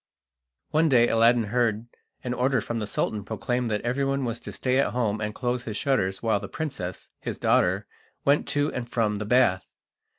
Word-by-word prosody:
One 160 +1 +3
day 120 -3 +5
Aladdin 115 +1 +4
heard 115 -3 +1 0.4
an 125 -1 -2
order 130 +1 +1
from 115 +2 -3
the 105 - -3
Sultan 105 0 -1
proclaimed 120 +4 -2
that 105 -1 -1
everyone 135 +2 0
was 115 -1 -3
to 105 - -8
stay 125 +6 0
at 140 - +1
home 110 -3 0
and 105 0 -3
close 125 0 -2
his 110 -2 -4
shutters 95 -9 0
while 110 -3 +2
the 100 - -7
princess, 135 - -5
his - - -4
daughter, - - +2 0.4
went 140 +1 +3
to 145 +1 0
and 120 -1 -4
from 110 -4 0
the 105 - -4
bath. 110 -5 +3
120 Hz, 190 wpm, -26 LUFS, 105-130 Hz, 0.4 s, day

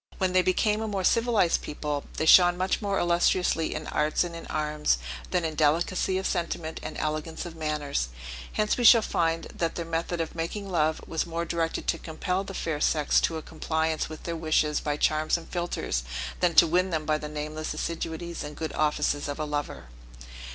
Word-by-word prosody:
When 185 -1 0
they 185 - +5
became 210 +4 +1
a 220 - -2
more 200 -3 -2
civilized 225 -4 +3
people, 150 -1 -4
they 160 - 0
shone 175 +2 +7
much 185 +4 0
more 200 -2 0
illustriously 175 -1 +2
in 155 - -4
arts 150 +2 +1
and 170 -1 -6
in 165 - -8
arms, 150 0 0 0.3
than 180 -2 0
in 160 - -2
delicacy 170 +5 +1
of 190 - -3
sentiment 170 -2 -2
and - - -6
elegance 155 +2 -3
of 170 -1 -8
manners: 150 - -2 0.4
hence 210 0 +1
we 245 - -1
shall 230 -1 +8
find, 165 -3 0
that 165 -1 -2
their 170 - -3
method 165 +1 -2
of 165 -1 -2
making 170 +5 -4
love 155 -2 +1
was 165 +1 -2
more 170 0 -2
directed 165 -1 -2
to - - 0
compel 180 +4 -2
the 195 -1 -8
fair 155 -3 -2
sex 150 -2 +3
to 165 - 0
a 160 - -6
compliance 160 0 -1
with 155 - -9
their 170 - -3
wishes 155 -2 +1
by 145 -1 -2
charms 155 +2 +2
and 165 - -11
philtres, 175 - -2 0.4
than 175 -2 +2
to 170 - +9
win 180 +3 +2
them 160 -3 -2
by 155 0 +1
the 150 - -6
nameless 155 +1 -4
assiduities 165 +1 -4
and 150 0 -8
good 160 -1 -4
offices 150 -1 0
of 145 - -4
a 155 - -1
lover. 145 -1 -4
165 Hz, 200 wpm, -27 LUFS, 155-175 Hz, 0.4 s, to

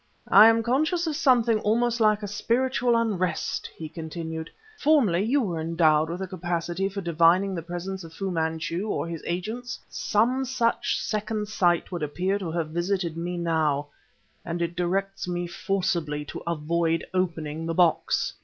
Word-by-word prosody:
"I 215 - +9
am 225 0 +4
conscious 310 +9 +1
of 315 -2 -1
something 245 -7 +3
almost 235 +3 +1
like 215 -1 +3
a - - -2
spiritual 240 +4 +1
unrest," 190 -7 -1
he 160 - -6
continued. 160 0 -6 0.3
"Formerly 260 - +3
you 255 +7 +2
were 175 -6 -2
endowed 160 -1 +3
with 175 +3 -4
a - - -4
capacity 175 +1 -2
for 200 0 -5
divining 170 +3 +3
the 170 - -3
presence 175 +3 -5
of 165 - -10
Fu 190 +3 -4
Manchu 165 +3 -2
or 170 - -1
his 165 -2 -5
agents. 215 +8 -4
Some 245 +5 +1
such 245 -2 0
second 215 0 -2
sight 175 -5 +1
would 175 -2 -4
appear 180 +7 -1
to 185 -4 -4
have 160 -1 -2
visited 175 0 -1
me 175 +1 -3
now, 155 -4 0 0.5
and 170 0 -4
it 170 0 -2
directs 195 +2 -1
me 175 0 -2
forcibly 170 -5 -2
to - - -7
avoid 165 0 0
opening 165 -3 -2
the 165 - -2
box." 175 -2 +2
180 Hz, 165 wpm, -26 LUFS, 165-215 Hz, 0.5 s, I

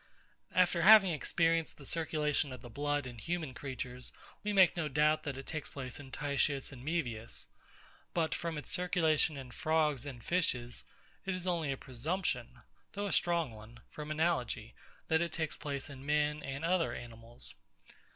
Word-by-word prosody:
After 180 -2 +4
having 195 0 +9
experienced 165 +1 +1
the 140 - -12
circulation 150 -2 0
of 130 -1 -8
the 120 - -9
blood 145 +2 0
in 120 -2 -7
human 160 0 -2
creatures, 130 -2 -5 0.3
we 210 - 0
make 190 -4 +6
no 165 -3 0
doubt 150 +2 +3
that 145 -4 -4
it 135 - -7
takes 155 -2 -5
place 130 -2 -5
in 140 -2 -10
TITIUS 140 0 0
and 125 -2 -10
MAEVIUS. 125 -8 -2 0.7
But 165 -2 +2
from 165 -2 -2
its 150 - -6
circulation 165 -5 +2
in 130 -2 -8
frogs 150 -1 +1
and 125 -4 -7
fishes, 125 -9 0 0.4
it 190 -1 -1
is 185 -1 -5
only 170 -5 +1
a 135 - -2
presumption, 150 +11 -2 0.3
though 205 0 -2
a 200 - -1
strong 170 -6 +2
one, 110 +2 -12
from 150 0 -7
analogy, 155 -8 0 0.3
that 160 +1 +3
it 170 - 0
takes 160 -2 -2
place 140 -3 -4
in 135 -2 -9
men 150 +1 +1
and 135 +3 -4
other 170 -8 +2
animals. 115 0 -10
150 Hz, 170 wpm, -33 LUFS, 130-165 Hz, 0.7 s, having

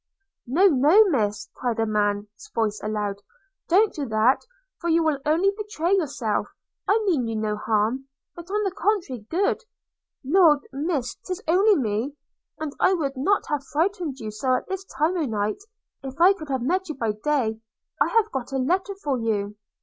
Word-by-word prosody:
'No, 325 +11 +3
no, 320 +5 +6
Miss!' 210 - 0
cried 240 -2 -2
a 225 - +2
man's 205 0 -2
voice 215 -2 0
aloud; 210 -2 -3 0.5
'don't 405 +5 +4
do 285 -3 -4
that, 220 +4 +3 0.4
for 340 - -2
you 330 0 +3
will 310 -3 +1
only 340 +6 +3
betray 400 -4 -1
yourself; 270 - -1 0.4
I 405 - +4
mean 300 - +1
you 225 - -3
no 215 -1 -1
harm, 220 +5 0 0.3
but, 345 +1 -10
on 420 +2 0
the 390 - 0
contrary, 350 - -1
good. 375 +5 +1 0.4
– - - -63
Lord, 305 -2 +4
Miss, 280 -3 -1
'tis 365 -1 -5
only 390 +6 +5
me; 235 - -1 0.4
and 310 -2 -4
I 370 - +4
would 285 -5 -2
not 385 +10 +1
have 295 -3 -1
frighted 325 -2 -1
you 215 -3 -5
so 255 +5 0
at - - -3
this 385 0 -4
time 310 +3 0
o'night 215 -9 -1 0.4
if 270 +1 -8
I 365 +3 +7
could 310 -6 -10
have 260 -3 -1
met 370 +6 0
you 310 - -3
by 230 -4 -1
day. 225 -1 -1 0.4
I - - +5
have 455 -2 +2
got 265 -1 -4
a - - +1
letter 370 +9 0
for 275 -4 0
you.' 210 -2 -1
280 Hz, 180 wpm, -24 LUFS, 225-355 Hz, 0.5 s, I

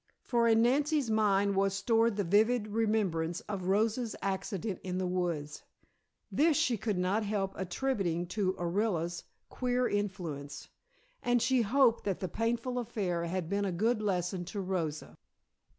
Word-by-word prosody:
For 235 -2 +2
in 225 0 +5
Nancy's 285 0 +2
mind 200 -2 +2
was 195 0 +2
stored 225 +2 +2
the 205 - 0
vivid 215 +4 +2
remembrance 205 -7 0
of 195 -3 -5
Rosa's 220 +4 +1
accident 195 0 -3
in 185 -1 -3
the 185 - -1
woods. 175 -5 -2 0.7
This 310 0 +3
she 290 -7 +2
could 210 -2 -2
not 185 +4 +1
help 200 -2 -1
attributing 185 -3 -1
to 190 -1 0
Orilla's 175 -2 -1 0.2
queer 250 0 0
influence, 170 -8 -4 0.5
and 245 0 +2
she 250 +2 +2
hoped 235 +1 +3
that 195 -3 -1
the 185 - -2
painful 235 +6 -1
affair 195 -8 -2
had 175 0 -2
been 200 +3 0
a 195 - 0
good 215 +6 +1
lesson 180 -2 -1
to 200 +3 -5
Rosa. 175 -5 -3
200 Hz, 150 wpm, -31 LUFS, 180-230 Hz, 0.7 s, in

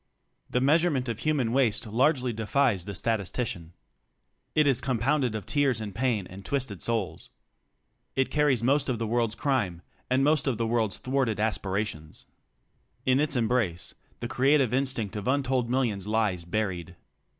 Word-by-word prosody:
The 125 - 0
measurement 145 -2 +3
of 115 -2 -3
human 140 -6 +1
waste 125 -3 +2
largely 125 +3 +1
defies 110 -3 +1
the 100 -1 -6
sta 115 +5 +1
tistician. 95 -4 -4 0.8
It 155 - +5
is 135 -4 +2
compounded 130 -1 +1
of 105 -4 -5
tears 140 -5 +1
and 105 -2 -5
pain 115 -3 0
and 95 +2 -11
twisted 125 -8 -3
souls. 115 -5 -2 0.9
It 135 0 +1
carries 145 -6 +2
most 140 +3 +2
of 125 - 0
the 115 - -2
world's 115 0 0
crime 105 - -1 0.3
and 130 +2 +3
most 150 0 +2
of 130 -5 +1
the 115 - 0
world's 110 -4 0
thwarted 130 -5 -1
aspirations. 100 -6 -2 0.8
In 130 +1 +3
its 150 -1 0
embrace, 115 -7 0 0.3
the - - -2
creative 135 -2 +3
instinct 130 -6 -1
of 105 +1 -4
untold 130 -3 +1
millions 115 -7 0
lies 105 -6 0
buried. 90 -3 -3
120 Hz, 155 wpm, -27 LUFS, 105-135 Hz, 0.9 s, It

